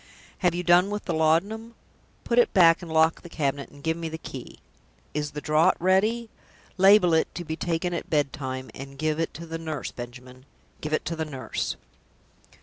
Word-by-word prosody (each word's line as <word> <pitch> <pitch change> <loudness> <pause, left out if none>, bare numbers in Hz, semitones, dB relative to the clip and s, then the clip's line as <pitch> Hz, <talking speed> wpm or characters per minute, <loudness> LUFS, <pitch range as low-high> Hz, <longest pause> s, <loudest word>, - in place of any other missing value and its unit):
"Have 175 -2 +2
you 180 - -2
done 180 +2 +5
with 210 0 -4
the 175 - -1
laudanum? 195 +9 +1 0.5
Put 240 0 +2
it 240 - +3
back, 165 -2 +6
and 170 -2 -8
lock 160 +1 +3
the 175 - -11
cabinet, 140 -3 -2
and 145 0 -16
give 160 0 +1
me 165 -1 -4
the 160 - -5
key. - - -9 0.6
Is 150 0 -2
the 150 0 -7
draught 155 +5 +3
ready? 210 +6 +2 0.5
Label 190 -2 +6
it, 160 - +3
'To 175 - -5
be 160 +1 -3
taken 175 +1 -1
at 170 - -4
bedtime,' 130 -3 -2
and 135 +1 -9
give 155 +1 -1
it 165 - -1
to 170 - -7
the 165 0 -5
nurse, 160 -3 -4
Benjamin 125 +2 -10 0.3
give 150 - -4
it 155 - 0
to 165 - -2
the 160 - -2
nurse." 135 -4 -4
160 Hz, 195 wpm, -26 LUFS, 150-180 Hz, 0.6 s, back